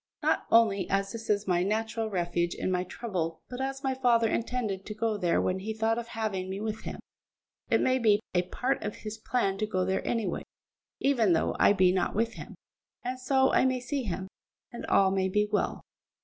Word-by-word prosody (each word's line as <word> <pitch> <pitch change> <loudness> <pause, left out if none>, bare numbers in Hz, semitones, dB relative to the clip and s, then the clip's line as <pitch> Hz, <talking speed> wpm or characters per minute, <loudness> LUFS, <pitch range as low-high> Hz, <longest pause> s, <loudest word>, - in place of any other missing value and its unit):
Not - - +1
only 215 -4 +4
as 195 0 0
this 225 -1 -7
is 205 -1 +1
my 175 -1 +2
natural 220 +3 -1
refuge 175 -2 -1
in - - -2
my 180 0 +1
trouble, 180 -5 -4
but 250 +1 -4
as 270 +1 -3
my 265 -1 +1
father 240 -3 +3
intended 220 -4 -2
to 210 - -5
go 225 0 0
there 180 -4 +1
when 185 +1 0
he 215 +3 -4
thought 225 +1 +1
of 235 - -6
having 215 -5 -3
me 190 +1 -4
with 215 0 -3
him, - - -5 0.7
it - - +4
may 260 0 +2
be 215 -3 +4
a 180 - +4
part 250 +9 -2
of 210 - -4
his 215 +1 -5
plan 200 -5 0
to 215 - 0
go 185 -3 0
there 190 +1 0
any 230 -3 0
way, - - -2 0.6
even 235 -9 +3
though 165 - +1
I - - +6
be 185 -2 +4
not 185 +1 0
with 230 +2 +1
him; - - -9 0.5
and 255 +1 -3
so 265 +1 +3
I - - +5
may 260 -1 +2
see 260 +3 -2
him, 190 -4 -4 0.4
and 240 - -7
all 190 -1 +4
may 190 -1 +1
be 210 +2 +2
well." - - 0
215 Hz, 215 wpm, -29 LUFS, 190-235 Hz, 0.7 s, I